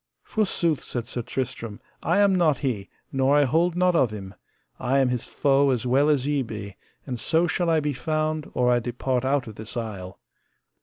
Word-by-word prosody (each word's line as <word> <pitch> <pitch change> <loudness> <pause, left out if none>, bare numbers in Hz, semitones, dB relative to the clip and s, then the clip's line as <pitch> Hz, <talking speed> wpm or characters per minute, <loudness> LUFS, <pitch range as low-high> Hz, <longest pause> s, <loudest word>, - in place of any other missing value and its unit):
Forsooth, 170 -8 0
said 120 -2 -4
Sir 120 0 -4
Tristram, 120 -3 -4 0.2
I 170 - +1
am 200 -1 +5
not 165 -6 +3
he, 115 -9 -3 0.2
nor 135 +1 +3
I 145 - +5
hold 165 +6 +2
not 180 0 +3
of 130 -7 +4
him; 100 -2 -8 0.5
I 135 +2 +1
am 135 -2 +3
his 125 -2 -2
foe 140 -1 +2
as 125 -2 0
well 135 +4 +3
as 140 -4 +2
ye 145 -1 +1
be, 105 -5 -6 0.3
and 125 -3 -4
so 165 +7 +2
shall 175 0 0
I 160 -1 +3
be 145 -1 -1
found 155 +3 -2
or 125 0 +3
I 120 - +4
depart 125 +1 -2
out 135 0 +1
of 110 -2 -10
this 110 +3 -7
isle. 100 -6 -6
135 Hz, 200 wpm, -25 LUFS, 120-155 Hz, 0.5 s, am